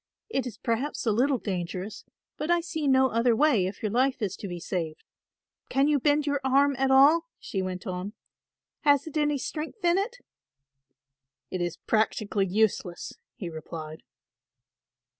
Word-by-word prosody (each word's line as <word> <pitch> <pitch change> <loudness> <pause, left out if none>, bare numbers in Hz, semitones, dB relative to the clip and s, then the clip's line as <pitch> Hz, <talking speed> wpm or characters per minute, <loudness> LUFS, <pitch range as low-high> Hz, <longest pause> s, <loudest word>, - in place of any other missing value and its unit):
It 270 - -1
is 220 -4 -8
perhaps 245 +7 -2
a 225 - +3
little 260 +5 +2
dangerous 185 0 -4 0.3
but 305 - -4
I 345 0 +4
see 320 -3 -3
no 265 -1 +5
other 230 0 +2
way 235 -9 +3
if 195 +3 -8
your 210 - 0
life 255 +3 +2
is 195 -2 -1
to 200 - -6
be 175 -2 -5
saved. 165 -2 -4 0.7
Can 275 +2 +3
you 295 -1 +3
bend 295 +2 +2
your 285 -1 0
arm 275 +1 +3
at 270 0 +2
all?" 290 +5 +6
she 195 - -3
went 185 -1 -4
on. 185 +3 -4 0.7
"Has 285 -1 +3
it 315 - -9
any 295 -1 +2
strength 320 - -5
in 345 +2 +4
it?" 465 +5 -3 1.3
"It 185 - -2
is 175 -1 -2
practically 215 -1 0
useless," 185 -3 0 0.2
he 185 - -6
replied. 155 -1 -7
245 Hz, 160 wpm, -27 LUFS, 190-290 Hz, 1.3 s, all